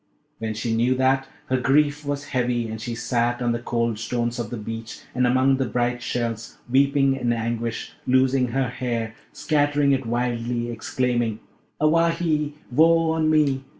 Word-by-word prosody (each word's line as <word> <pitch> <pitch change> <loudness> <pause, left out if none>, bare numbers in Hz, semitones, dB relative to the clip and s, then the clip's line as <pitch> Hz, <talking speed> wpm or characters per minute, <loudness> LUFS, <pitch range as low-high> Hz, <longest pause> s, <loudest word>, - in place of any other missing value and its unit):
When 110 -1 -3
she 115 +1 -1
knew 120 +3 +2
that, 130 +1 +2 0.2
her 130 0 0
grief 145 +3 +2
was 145 0 -4
heavy, 125 -3 0
and 110 0 -6
she 115 +1 -4
sat 120 0 0
on 120 -1 0
the 120 - -1
cold 115 -2 -1
stones 120 +1 -2
of 115 -3 -3
the 120 - -5
beach 115 +1 -7
and 125 0 +2
among 130 +2 +3
the 135 -2 0
bright 120 +2 -1
shells, 115 -2 -3
weeping 135 +1 +3
in 125 -3 0
anguish, 115 0 -3
loosing 130 0 +3
her 130 +1 -1
hair, 120 -3 -3 0.2
scattering 145 -1 +1
it 135 -3 0
wildly, 120 0 -1
exclaiming, 120 -1 -1 0.4
'Awahy! 160 -1 +2 0.2
woe 165 +4 +4
on 160 -1 +1
me! 145 -4 +2
125 Hz, 160 wpm, -24 LUFS, 120-140 Hz, 0.4 s, woe